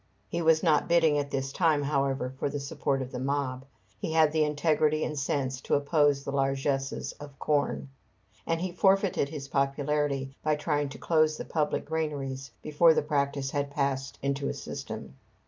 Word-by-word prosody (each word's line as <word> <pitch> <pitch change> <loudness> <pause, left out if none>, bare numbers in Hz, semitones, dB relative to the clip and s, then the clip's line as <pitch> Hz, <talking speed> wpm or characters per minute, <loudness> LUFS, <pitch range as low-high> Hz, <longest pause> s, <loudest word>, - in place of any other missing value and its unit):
He 170 - -2
was 160 -1 +4
not 155 -4 +3
bidding 165 -3 +4
at 140 -1 -3
this 135 -1 -2
time, 160 -5 +2
however, 135 -2 0
for - - 0
the 145 +1 -3
support 140 -1 -1
of 130 - -9
the 125 - -4
mob. 135 -1 -2 0.3
He 160 - -3
had 160 -2 +5
the 155 0 +2
integrity 155 0 +2
and 150 - -2
sense 135 -2 -1
to - - +1
oppose 145 -1 +2
the 140 - -4
largesses 135 0 -1
of 145 -1 -10
corn; 145 -1 0 0.6
and 165 0 0
he 185 0 -2
forfeited 190 -4 +2
his 145 -2 -6
popularity 140 0 0
by 155 0 +1
trying 150 -1 -1
to - - -9
close 155 -2 +2
the - - -6
public 150 -2 -1
granaries 140 -4 -3
before 160 +2 +5
the - - +2
practice 140 -2 -1
had 145 -1 -1
passed 140 -1 -2
into 140 0 -1
a - - -3
system. 65 - -7
145 Hz, 180 wpm, -28 LUFS, 135-155 Hz, 0.6 s, had